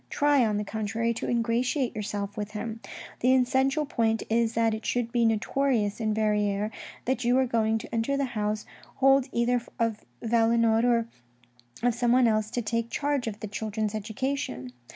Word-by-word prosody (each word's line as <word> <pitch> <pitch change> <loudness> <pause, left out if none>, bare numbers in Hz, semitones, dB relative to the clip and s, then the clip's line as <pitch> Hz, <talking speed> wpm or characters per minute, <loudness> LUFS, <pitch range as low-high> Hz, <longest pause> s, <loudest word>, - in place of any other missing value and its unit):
Try, 290 -2 +3
on 215 -2 +1
the 210 - -1
contrary, 220 +2 -2
to - - -4
ingratiate 240 +2 0
yourself 205 -1 -4
with 210 0 -5
him. 220 +1 -5 0.4
The 255 +2 +4
essential 265 +4 +2
point 225 -5 0
is 230 0 +2
that 225 -1 +2
it 220 0 -5
should 240 -1 -1
be 235 -1 +2
notorious 225 -1 +1
in 220 -1 0
Verrieres 210 -1 +1 0.3
that 255 0 0
you 245 +2 +3
are 265 - +3
going 225 -2 +1
to 220 - -9
enter 230 +5 0
the 280 - +1
house 215 -3 -2 0.3
hold 270 0 +4
either 240 +1 +1 0.2
of 230 -2 -1 0.2
Valenod 230 0 +3
or 235 -2 +2 0.8
of 245 -1 +3
someone 245 +1 +3
else 215 -1 +1
to 240 +1 -2
take 230 +1 -1
charge 285 -3 -1
of 215 0 -5
the 215 - -4
children's 215 +1 -3
education. 220 - -3
230 Hz, 170 wpm, -27 LUFS, 215-245 Hz, 0.8 s, The